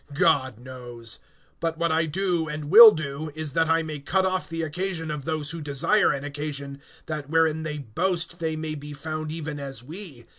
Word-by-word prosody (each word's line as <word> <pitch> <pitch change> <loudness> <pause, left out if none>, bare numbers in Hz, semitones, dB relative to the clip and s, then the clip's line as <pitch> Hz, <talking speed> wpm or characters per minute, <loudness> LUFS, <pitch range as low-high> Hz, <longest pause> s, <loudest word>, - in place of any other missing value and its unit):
God 130 -6 +2
knows. 120 -3 -8 0.4
(12)But 165 -1 -1
what 170 0 +1
I 160 0 +2
do, 175 0 0
and 150 0 -5
will 225 +3 +12
do, 155 -4 -4
is 155 -3 -3
that 165 -1 +2
I 165 0 +3
may 155 -2 -5
cut 190 +7 +1
off 185 0 -1
the 165 0 -3
occasion 165 0 -3
of 145 -2 -5
those 155 -2 -2
who 165 -1 -6
desire 150 +9 +2
an 140 - -3
occasion, 140 -1 -5 0.2
that 150 -3 -5
wherein 160 0 +2
they 155 -1 -4
boast 170 - -2
they 160 -1 -1
may 155 0 -3
be 145 0 -7
found 155 +1 -5
even 155 -2 -5
as 135 -3 -5
we. 155 - -9
155 Hz, 195 wpm, -25 LUFS, 145-165 Hz, 0.4 s, will